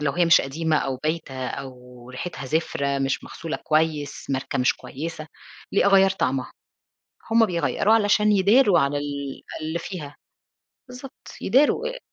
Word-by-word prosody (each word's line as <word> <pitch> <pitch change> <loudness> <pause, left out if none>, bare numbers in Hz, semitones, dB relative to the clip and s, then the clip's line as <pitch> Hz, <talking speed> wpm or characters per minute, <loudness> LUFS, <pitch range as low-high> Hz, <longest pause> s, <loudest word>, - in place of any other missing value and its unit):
لو 145 -2 0
هي 175 0 +2
مش 170 - +6
قديمة 155 +3 -1
أو 135 -3 -1
بايتة 135 -5 -3
أو 125 -2 -9
ريحتها 135 +1 -6
زفرة، 140 -2 -1
مش 135 -1 -1
مغسولة 165 -1 -6
كويس، 155 -2 -1
ماركة 135 0 -2
مش 125 - +3
كويسة، 155 +2 -7 0.5
ليه 200 - +3
أغيّر 195 -1 +5
طعمها؟ 130 -8 -1 0.8
هُم 225 -1 +5
بيغيروا 180 +4 +1
علشان 210 -1 +3
يداروا 205 +1 +5
على 140 +1 0
ال 140 -1 -5 0.2
اللي 160 +2 -2
فيها. 165 -5 -7 0.7
بالضبط، 250 +1 -12
يداروا 295 - +3
آآ، - - -6
155 Hz, 145 wpm, -24 LUFS, 135-195 Hz, 0.8 s, مش